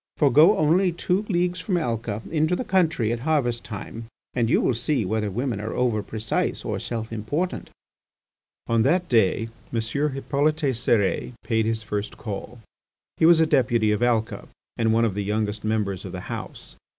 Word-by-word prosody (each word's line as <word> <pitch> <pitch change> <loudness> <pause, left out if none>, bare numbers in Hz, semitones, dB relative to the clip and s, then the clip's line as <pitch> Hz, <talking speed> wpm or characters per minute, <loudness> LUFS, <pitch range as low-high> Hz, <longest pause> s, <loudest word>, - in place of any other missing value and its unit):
For 145 -3 +4
go 160 - +6
only 175 +5 +3
two 180 +4 -1
leagues 180 -1 0
from 185 -4 -1
Alca 115 -7 -2
into 155 +2 +2
the 255 - -3
country 165 - +1
at 120 - -3
harvest 125 -4 0
time, 115 +1 -7 0.3
and 120 -2 +1
you - - +4
will - - +2
see 120 0 0
whether 105 +2 -1
women 115 +1 -2
are 110 - -4
over 120 -4 +1
precise 110 +1 -2
or - - -2
self 115 -1 -5
important." 145 - -3 1.0
On 115 -1 +2
that 175 +9 +2
day 115 0 +2 0.2
M. 115 - 0
Hippolyte 140 +5 0 0.2
Cérès 115 -1 +1
paid 110 -1 +1
his 110 -1 -1
first 105 -1 -4
call. 110 +2 -6 0.6
He 160 - +5
was 170 -1 +7
a 160 - +5
Deputy 120 -7 +2
of 105 - 0
Alca, 115 -2 0 0.3
and 115 -1 +1
one 115 +1 +3
of 110 - 0
the 100 +1 -2
youngest 105 +1 -2
members 105 -4 -1
of - - -7
the - - -5
House. - - -7
115 Hz, 175 wpm, -24 LUFS, 110-150 Hz, 1.0 s, was